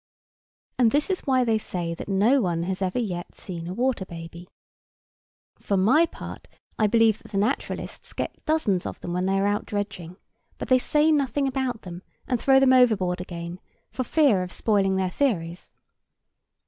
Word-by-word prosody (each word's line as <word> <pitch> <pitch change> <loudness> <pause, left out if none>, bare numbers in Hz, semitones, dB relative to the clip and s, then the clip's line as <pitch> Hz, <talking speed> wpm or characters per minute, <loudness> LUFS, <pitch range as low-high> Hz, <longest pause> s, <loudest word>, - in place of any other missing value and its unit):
And 240 -2 +5
this 295 - +1
is 370 - -3
why 260 -2 +3
they 225 -2 +1
say 175 -5 -4
that 170 - -8
no 215 +8 +3
one 170 -4 -1
has 190 +2 -3
ever 185 +4 -1
yet 180 -8 -3
seen 170 -3 -7
a 180 - -4
water 250 -3 0
baby. 170 0 -10 1.1
For 200 - -1
my 260 - +4
part, - - -9 0.3
I 215 - +4
believe 225 0 +3
that - - -15
the - - 0
naturalists 215 +8 -2
get - - -5
dozens 220 - +1
of - - -7
them 175 - -4
when 180 +1 0
they 195 0 +1
are 195 - +1
out 205 0 0
dredging; 195 -4 -5 0.4
but - - -6
they 255 0 +5
say 300 +4 +2
nothing 280 -2 +1
about 260 -3 -2
them, 175 -1 -8 0.3
and 250 -3 -1
throw 270 -1 +5
them 265 -1 +5
overboard 200 -8 +3
again, 170 0 -7 0.3
for 260 - -2
fear 265 -8 +3
of 180 0 -5
spoiling 195 -3 +1
their 190 -1 0
theories. 180 -11 -1
205 Hz, 180 wpm, -25 LUFS, 180-255 Hz, 1.1 s, And